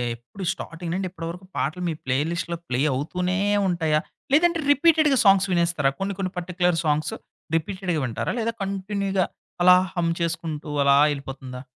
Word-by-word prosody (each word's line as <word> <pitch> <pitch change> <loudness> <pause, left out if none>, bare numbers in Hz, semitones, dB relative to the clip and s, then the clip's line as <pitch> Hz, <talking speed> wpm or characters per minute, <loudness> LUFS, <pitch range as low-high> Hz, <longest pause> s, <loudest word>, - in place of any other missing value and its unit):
ఎప్పుడు 125 +12 -11
స్టార్టింగ్ 165 +1 -7
నుండి 190 0 -1
ఇప్పటి 165 -2 -7
వరకు 180 +2 -8
పాటలు 160 +6 -1
మీ 160 - -1
ప్లే 130 0 +1
లిస్ట్‌లో 170 0 -3
ప్లే 125 +1 0
అవుతూనే 180 +6 -1 0.3
ఉంటాయా? 160 -4 +1 0.3
లేదంటే 340 +2 +4
రిపీటెడ్‌గా 300 -2 +4
సాంగ్స్ 195 0 +6
వినేస్తారా? 170 -5 +2
కొన్ని 195 0 -2
కొన్ని 185 -1 -2
పర్టిక్యులర్ 180 -1 0
సాంగ్స్ 150 0 +1 0.4
రిపీటెడ్‌గా 180 0 -1
వింటారా? 115 -2 -2
లేదా 230 0 0
కంటిన్యూగా 195 -1 -1 0.4
అలా 180 0 +9 0.2
హమ్ 170 -1 +1
చేసుకుంటూ 165 -3 -3
అలా 140 0 +5 0.2
ఎళ్ళిపోతుందా? 130 -2 -7
175 Hz, 150 wpm, -24 LUFS, 155-195 Hz, 0.4 s, అలా